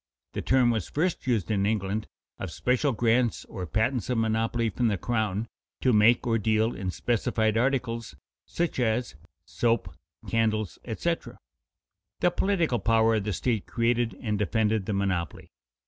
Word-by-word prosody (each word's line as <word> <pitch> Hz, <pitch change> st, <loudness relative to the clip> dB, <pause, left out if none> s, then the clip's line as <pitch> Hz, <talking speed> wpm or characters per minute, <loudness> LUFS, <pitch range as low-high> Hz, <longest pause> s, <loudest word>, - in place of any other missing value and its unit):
The -, -, -3 dB
term 130 Hz, -2 st, +3 dB
was 110 Hz, -6 st, -2 dB
first 165 Hz, -1 st, -1 dB
used 110 Hz, -5 st, +1 dB
in 100 Hz, -2 st, +1 dB
England 105 Hz, 0 st, -1 dB, 0.3 s
of 95 Hz, -, -4 dB
special 125 Hz, -, +1 dB
grants 120 Hz, 0 st, +1 dB
or 90 Hz, -2 st, -6 dB
patents 115 Hz, -, 0 dB
of 125 Hz, -, +1 dB
monopoly 115 Hz, +1 st, 0 dB
from 120 Hz, +5 st, 0 dB
the 105 Hz, -3 st, +1 dB
crown 110 Hz, +1 st, -1 dB, 0.3 s
to 130 Hz, -, +3 dB
make 110 Hz, +3 st, +5 dB
or 115 Hz, -1 st, +2 dB
deal 110 Hz, +2 st, +1 dB
in 95 Hz, 0 st, -3 dB
specified 110 Hz, +1 st, 0 dB
articles, 115 Hz, -, -1 dB, 0.3 s
such 170 Hz, -5 st, -2 dB
as 120 Hz, 0 st, 0 dB, 0.3 s
soap, 115 Hz, -8 st, 0 dB, 0.3 s
candles, 110 Hz, -4 st, 0 dB
etc. -, -, -3 dB, 0.8 s
The 175 Hz, -, +3 dB
political 175 Hz, -, +1 dB
power 115 Hz, 0 st, +3 dB
of 105 Hz, -3 st, 0 dB
the 105 Hz, -, -1 dB
state 110 Hz, +2 st, -1 dB
created 120 Hz, 0 st, 0 dB
and 105 Hz, -4 st, -2 dB
defended 110 Hz, -1 st, +1 dB
the 105 Hz, -, -1 dB
monopoly. 95 Hz, -5 st, -2 dB
115 Hz, 150 wpm, -27 LUFS, 105-120 Hz, 0.8 s, make